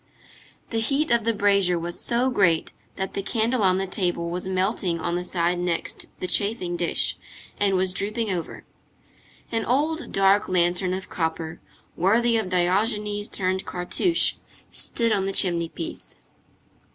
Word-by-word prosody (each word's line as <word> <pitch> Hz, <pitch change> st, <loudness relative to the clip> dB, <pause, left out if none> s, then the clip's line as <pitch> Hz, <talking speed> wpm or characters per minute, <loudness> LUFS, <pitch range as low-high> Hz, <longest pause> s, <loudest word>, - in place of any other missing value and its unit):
The 225 Hz, -, 0 dB
heat 275 Hz, +6 st, +1 dB
of 235 Hz, -2 st, +3 dB
the 230 Hz, -, +3 dB
brazier 200 Hz, -4 st, +3 dB
was 170 Hz, +1 st, -4 dB
so 245 Hz, +2 st, +1 dB
great, 170 Hz, -8 st, +2 dB, 0.2 s
that 190 Hz, 0 st, -3 dB
the 200 Hz, -, -2 dB
candle 225 Hz, +4 st, 0 dB
on 185 Hz, -2 st, +4 dB
the 195 Hz, -, 0 dB
table 175 Hz, -3 st, -1 dB
was 180 Hz, +2 st, -3 dB
melting 185 Hz, -2 st, 0 dB
on 170 Hz, +1 st, -1 dB
the 180 Hz, -, -2 dB
side 175 Hz, 0 st, 0 dB
next 175 Hz, -2 st, -2 dB
the -, -, -2 dB
chafing 185 Hz, -2 st, 0 dB
dish, 175 Hz, -1 st, 0 dB, 0.4 s
and 200 Hz, -1 st, +3 dB
was 185 Hz, 0 st, +1 dB
drooping 215 Hz, +3 st, 0 dB
over. 175 Hz, -3 st, -4 dB, 0.9 s
An 225 Hz, -1 st, 0 dB
old 305 Hz, +8 st, 0 dB
dark 195 Hz, +1 st, +3 dB
lantern 180 Hz, +1 st, +2 dB
of 190 Hz, -, -6 dB
copper, 160 Hz, -1 st, -3 dB, 0.3 s
worthy 230 Hz, +6 st, +3 dB
of 220 Hz, -5 st, 0 dB
Diogenes 205 Hz, +3 st, +1 dB
turned 190 Hz, 0 st, -2 dB
Cartouche, 185 Hz, -, +1 dB, 0.3 s
stood 230 Hz, -1 st, +1 dB
on 195 Hz, -2 st, +1 dB
the 195 Hz, -, -2 dB
chimney 170 Hz, -4 st, +1 dB
piece. 165 Hz, -, -6 dB
190 Hz, 150 wpm, -24 LUFS, 175-220 Hz, 0.9 s, on